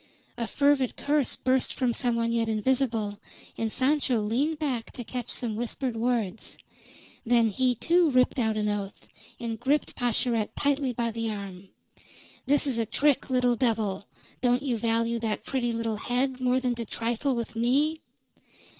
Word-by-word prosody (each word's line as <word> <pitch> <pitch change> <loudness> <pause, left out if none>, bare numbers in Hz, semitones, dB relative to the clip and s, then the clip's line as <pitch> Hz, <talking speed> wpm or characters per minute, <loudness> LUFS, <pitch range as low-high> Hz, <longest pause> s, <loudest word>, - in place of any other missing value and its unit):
A 235 -2 -3
fervid 280 -3 +2
curse 290 -2 +1
burst 260 0 0
from 250 -3 +1
some 240 0 +1
one 230 0 0
yet 230 -1 +1
invisible, 220 -2 0 0.4
and 225 -1 -2
Sancho 265 -2 +2
leaned 255 +10 0
back 265 -7 -2
to 245 - -6
catch 245 0 -5
some 230 -3 -2
whispered 240 +2 -3
words. 225 -3 -2 0.7
Then 235 -2 +3
he, 250 +4 +1
too, 340 +7 +3
ripped 255 0 +3
out 220 -2 +1
an 210 0 0
oath, 205 -1 -4 0.3
and 230 -2 -4
gripped 285 +4 0
Pascherette 235 -2 0
tightly 280 -2 +1
by 235 -1 -1
the 230 0 -2
arm. 195 -2 -7 0.8
"This 290 +2 +4
is 260 -5 +1
a 225 - +1
trick, 280 +5 +1
little 250 -1 +2
devil! 220 -5 0 0.3
Don't 245 +1 +2
you 260 -4 0
value 230 +1 0
that 220 -2 -2
pretty 245 -3 -1
little 225 -1 -2
head 255 +4 -1
more 255 0 +2
than 250 -1 0
to 235 -1 -5
trifle 235 +5 -1
with 235 -1 -4
me?" 280 +7 +1
240 Hz, 165 wpm, -27 LUFS, 225-260 Hz, 0.8 s, This